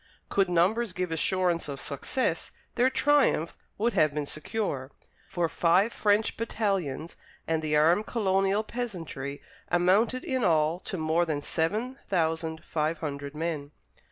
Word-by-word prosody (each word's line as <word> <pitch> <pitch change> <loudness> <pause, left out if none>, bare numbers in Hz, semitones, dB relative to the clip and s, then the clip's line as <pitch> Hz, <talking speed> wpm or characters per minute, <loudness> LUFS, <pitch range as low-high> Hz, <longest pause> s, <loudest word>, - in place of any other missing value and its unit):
Could 195 -2 +2
numbers 190 +5 +2
give 180 -1 -2
assurance 175 0 +1
of 140 -1 -4
success, 150 - -2 0.2
their 250 +2 +3
triumph 265 - +2 0.2
would 230 +2 +1
have 155 -1 +3
been 150 -1 -1
secure, 155 -5 -3 0.4
for 175 -2 0
five 180 +7 +3
French 210 +1 +2
battalions 195 -9 -2 0.3
and 160 -1 +1
the 155 -1 0
armed 170 +8 +4
colonial 195 -1 +1
peasantry 170 - -5 0.3
amounted 200 +8 +3
in 260 -2 0
all 160 0 +3
to 190 - -5
more 160 +2 +1
than 145 -2 -2
seven 215 +11 -1
thousand 160 -2 0
five 155 +1 -1
hundred 145 -2 -5
men. 155 -3 -3
175 Hz, 135 wpm, -28 LUFS, 155-210 Hz, 0.4 s, armed